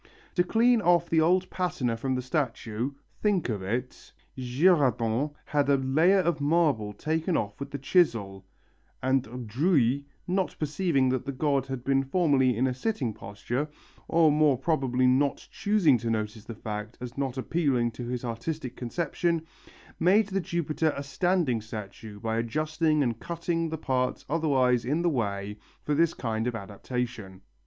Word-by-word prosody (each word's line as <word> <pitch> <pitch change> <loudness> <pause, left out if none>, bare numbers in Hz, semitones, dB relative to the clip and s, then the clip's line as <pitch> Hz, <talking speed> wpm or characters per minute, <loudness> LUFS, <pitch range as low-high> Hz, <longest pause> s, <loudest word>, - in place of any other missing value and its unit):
To 180 - +3
clean 230 +5 +3
off 175 -2 +3
the 160 -1 +4
old 180 +3 +3
patina 175 -11 -1
from 130 +3 -2
the 125 - -2
statue 125 -3 -2 0.3
think 200 -9 +1
of 105 -4 -2
it 120 +7 -4 0.2
Girardon 130 - +2 0.2
had 145 -1 +1
a 140 - +5
layer 160 +9 +3
of 170 -4 -1
marble 145 -9 +2
taken 160 - -1
off 105 -1 -3
with 140 - -5
the 140 - -4
chisel, 115 - +1 0.6
and 125 -2 0
Drouilly, 140 - +2 0.2
not 185 +1 0
perceiving 150 -3 +1
that 130 -1 0
the - - -1
god 140 -1 0
had 135 -2 -5
been 135 0 +2
formerly 135 -5 +2
in 125 - +2
a 130 - +1
sitting 130 - -2
posture, 115 +9 -4 0.4
or 165 -2 +4
more 150 -3 +4
probably 130 -3 +1
not 135 +2 +2
choosing 195 - +3
to 115 +1 -3
notice 110 -1 -3
the 115 - -7
fact 105 +1 -6
as 125 -1 -7
not 135 -2 -2
appealing 130 -4 +1
to 120 +1 -7
his 125 0 -3
artistic 125 +4 -4
conception, 165 +5 -1 0.5
made 200 +4 +4
the 195 0 0
Jupiter 160 -2 -1
a 140 - -3
standing 160 - +1
statue 105 -1 -8
by 110 0 -2
adjusting 155 +6 +1
and 115 -3 -1
cutting 170 -1 -2
the 160 - -3
parts 130 -3 -1
otherwise 135 -6 +2
in 150 +8 0
the 175 - +3
way 105 -5 -2 0.2
for 150 - -1
this 165 +2 +2
kind 115 -1 -2
of 120 - -2
adaptation. 105 -1 -5
135 Hz, 160 wpm, -27 LUFS, 120-160 Hz, 0.6 s, a